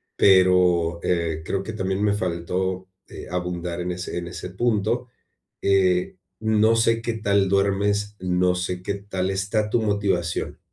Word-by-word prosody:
pero, 90 -3 +4
eh, 85 -3 0
creo 95 +3 -2
que - - -6
también 95 -1 -2
me 105 -1 +3
faltó, 95 0 -2 0.2
eh, - - -9
abundar 90 -1 -3
en 90 +1 -2
ese 90 0 -5
en 85 - -6
ese 90 +1 -7
punto, 120 +4 0 0.5
eh, 95 -2 +2 0.2
no 110 0 +3
sé, 115 0 +2
qué 115 0 -1
tal 100 -3 +1
duermes, 100 +1 +1
So 90 0 +1
sé, 90 0 -3
qué 100 +2 -2
tal 95 -2 -3
está 100 +3 -1
tu 115 - +2
motivación. 100 -5 -1
95 Hz, 150 wpm, -23 LUFS, 90-105 Hz, 0.5 s, pero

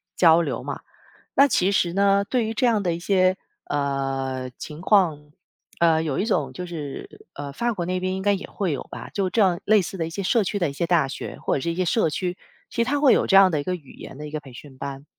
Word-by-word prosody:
交 165 -1 +6
流 - - -3
嘛。 - - -5 0.5
那 275 - +7
其 195 -7 +2
实 175 -3 +1
呢， 200 0 +3
对 245 +1 0
于 220 - -3
这 260 - +1
样 225 -4 +3
的 175 -3 0
一 170 - -6
些， 185 0 +2 0.3
呃， 135 -2 -2
情 155 +2 -8
况， 165 -8 +2 0.5
呃， 165 -2 +4
有 150 -4 -2
一 200 - +1
种 155 - 0
就 180 +8 -6
是， 155 -5 -8
呃， 140 -1 -6
法国 220 -1 -1
那 185 +1 -1
边 185 0 -2
应 190 - -4
该 205 - +3
也 195 - -4
会 190 -5 -2
有 - - -4
吧， - - -8
就 195 -2 0
这 190 -6 +2
类 215 -1 +5
似 190 - -6
的 165 -2 -2
一 - - -6
些 190 +4 -4
社 215 +3 +2
区 205 - -2
的 175 - +1
一 140 - -7
些 170 +3 -2
大 165 -6 +3
学 135 - -7
或 - - -1
者 135 - -2
是 170 - -1
一 - - -4
些 185 0 0
社 195 -1 +2
区， 180 +4 -3 0.4
其 235 - +1
实 - - -4
它 285 +1 +1
会 280 -3 +6
有 - - +2
这 195 - +6
样 195 -1 +7
的 150 -3 0
一 - - -7
个 180 +4 -2
语 150 -7 -13
言 135 - -11
的 150 - -7
一 150 - -10
个 155 - -3
培 135 -3 -14
训 135 +2 -12
班。 140 +1 -6
175 Hz, 290 characters per minute, -24 LUFS, 145-195 Hz, 0.5 s, 那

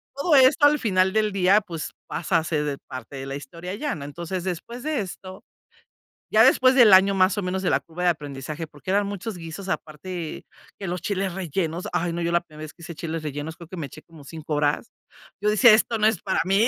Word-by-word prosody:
Todo 295 +3 +2
esto, 265 +2 +6
al 300 +1 +3
final 190 -5 +2
del 215 -1 +2
día, 195 +2 +4
pues, 170 -6 -6
pasa 170 +1 0
a - - -4
ser 150 -3 -1
parte 130 +2 -8
de 135 - -6
la 135 - -4
historia 170 +6 -7
ya, 290 +7 -2
¿no?. 140 -2 -7
Entonces, 170 +4 -5
después 210 +8 -5
de 305 -5 -1
esto, 185 0 -9 0.9
ya - - +6
después 255 0 +5
del 240 -5 +7
año 195 +1 +7
más 190 +2 +3
o - - 0
menos 185 +1 -2
de 180 - +1
la - - +3
curva 170 +2 -7
de 175 - +4
aprendizaje, 150 +1 -4
porque 150 +5 -7
eran 200 +1 +2
muchos 200 0 -5
guisos, 170 +4 -7
aparte 165 +1 -5 0.3
que 195 - -5
los 180 0 -3
chiles 190 -1 -2
rellenos, 175 -1 -3
ay 170 0 0
no, 170 - -3
yo 170 0 -1
la 170 - +3
primera 155 -2 -12
vez 155 - -11
que 170 - -20
hice 170 0 -8
chiles 160 0 -4
rellenos, 150 +2 -5
creo 170 -2 -12
que 185 - -8
me 155 - -3
eché 155 - -13
como 160 -4 -16
5 160 0 -6
horas. 145 +9 0 0.5
Yo 210 - +2
decía: 215 +2 +7
"Esto 225 +1 +2
no 215 - +3
es 220 -5 0
para 190 - 0
mí". 195 +5 +3
180 Hz, 235 wpm, -24 LUFS, 160-200 Hz, 0.9 s, del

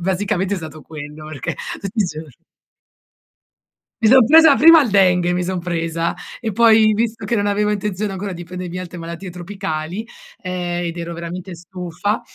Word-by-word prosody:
basicamente 190 +1 -1
è - - -3
stato 155 -2 -8
quello 155 0 -9
perché 145 -5 -5 0.2
tutti 200 +3 -6
i 205 - +3
giorni 155 -3 -8 1.7
Mi - - +7
son 255 0 +7
presa 320 0 +7
prima 325 +1 +8
il 235 - -2
dengue, 180 -3 +3
mi 180 0 -1
son 185 -1 -2
presa 165 -1 -2 0.3
e 225 - -2
poi, 220 0 +5
visto 225 -1 -1
che 235 +3 0
non 205 -1 0
avevo 210 +1 +1
intenzione 205 0 -2
ancora 195 0 -4
di 175 0 -7
prendermi 180 0 -7
altre 180 -1 -8
malattie 170 +3 -7
tropicali, 180 +1 -5 0.4
ehm, 175 -1 -3
ed 170 0 -5
ero 170 0 -5
veramente 175 +2 -7
stufa 180 +3 -4
185 Hz, 170 wpm, -19 LUFS, 170-205 Hz, 1.7 s, prima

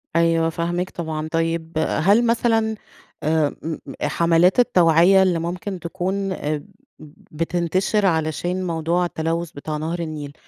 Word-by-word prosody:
أيوه، 165 -1 +3
فاهماك 175 +2 -2
طبعًا. 160 -2 -4
طيب، 165 0 -1
هل 200 +8 +3
مثلًا 225 -1 +1 0.5
آآ، 155 0 +2 0.2
امم، 160 -1 -4 0.2
حملات 170 +4 +3
التوعية 180 -3 +5
اللي 180 -3 +1
ممكن 180 +3 -4
تكون 190 +3 -3
ب 150 -3 -3 0.7
بتنتشر 175 +6 0
علشان 175 +2 0
موضوع 170 +2 0
التلوث 165 0 -2
بتاع 150 +2 -5
نهر 160 +3 -3
النيل، 155 -3 -5
170 Hz, 120 wpm, -22 LUFS, 160-185 Hz, 0.7 s, التوعية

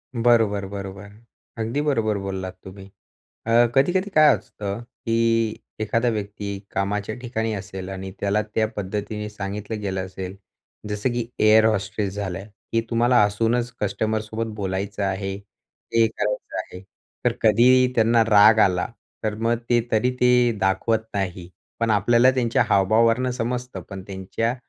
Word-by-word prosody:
बरोबर, 115 -4 +3
बरोबर. 100 0 -7 0.5
अगदी 115 +6 -1
बरोबर 115 -8 +1
बोललात 95 -1 -5
तुम्ही. 95 +1 -11 0.6
अ, 115 +1 +5
कधी-कधी 180 +9 +2
काय 155 -2 +7
असतं, 100 +1 -6
की 115 -1 0 0.3
एखादा 115 +3 +1
व्यक्ती 105 -2 -4 0.2
कामाच्या 100 +2 -2
ठिकाणी 115 -3 -2
असेल. 95 -2 -6
आणि 95 0 -6
त्याला 100 +1 +1
त्या 110 -1 +2
पद्धतीने 105 +1 -4
सांगितलं 105 +1 -5
गेलं 95 -2 -2
असेल, 95 0 -7 0.5
जसं 105 +4 -1
की 120 -1 -1
एअर 110 +1 +6
होस्टेस 105 -2 -1
झालं, 100 -1 -4 0.3
की 115 0 +2
तुम्हाला 120 -1 +4
हसूनच 115 +4 0
कस्टमरसोबत 110 +2 -2
बोलायचं 100 +1 -3
आहे, 95 0 -2
हे 110 +3 -3
करायचं 105 -1 -3
आहे. 90 - -8 0.4
तर - - +4
कधी 125 +4 +5
त्यांना 115 0 +4
राग 110 +1 +7
आला, 90 -4 +3 0.4
तर 110 -1 -1
मग 115 +2 +1
ते 120 -1 +4
तरी 115 +3 +2
ते 125 -1 +5
दाखवत 110 +4 +1
नाही, 95 -3 -3 0.3
पण 115 - +1
आपल्याला 120 +5 +4
त्यांच्या 120 -3 +1
हावभावावरनं 115 +6 +3
समजतं, 125 -4 -3
पण 95 -1 -7
त्यांच्या 100 +5 -2
110 Hz, 135 wpm, -23 LUFS, 100-115 Hz, 0.6 s, काय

